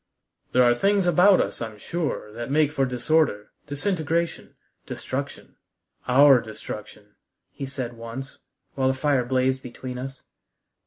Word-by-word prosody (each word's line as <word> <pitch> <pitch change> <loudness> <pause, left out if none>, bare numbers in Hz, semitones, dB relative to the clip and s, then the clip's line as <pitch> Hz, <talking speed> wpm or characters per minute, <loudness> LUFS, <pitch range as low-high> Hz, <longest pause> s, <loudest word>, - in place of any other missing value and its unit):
"There 125 - +5
are 120 0 +5
things 195 +9 +2
about 180 +3 +5
us, - - -2
I'm 110 -2 -5
sure, 150 -5 -3
that 120 +2 -6
make 150 +1 +3
for 135 -3 +1
disorder, 125 -3 +1 0.2
disintegration, 165 +1 -2 0.3
destruction, - - -6 0.5
our 135 0 +7
destruction," 105 -1 -9 0.4
he 135 - -6
said 130 -3 -5
once, 115 +4 -8 0.3
while 130 -1 +1
the 130 - +2
fire 135 -2 +1
blazed 130 +1 +1
between 125 0 -7
us. 135 +1 -7
130 Hz, 135 wpm, -25 LUFS, 120-150 Hz, 0.5 s, our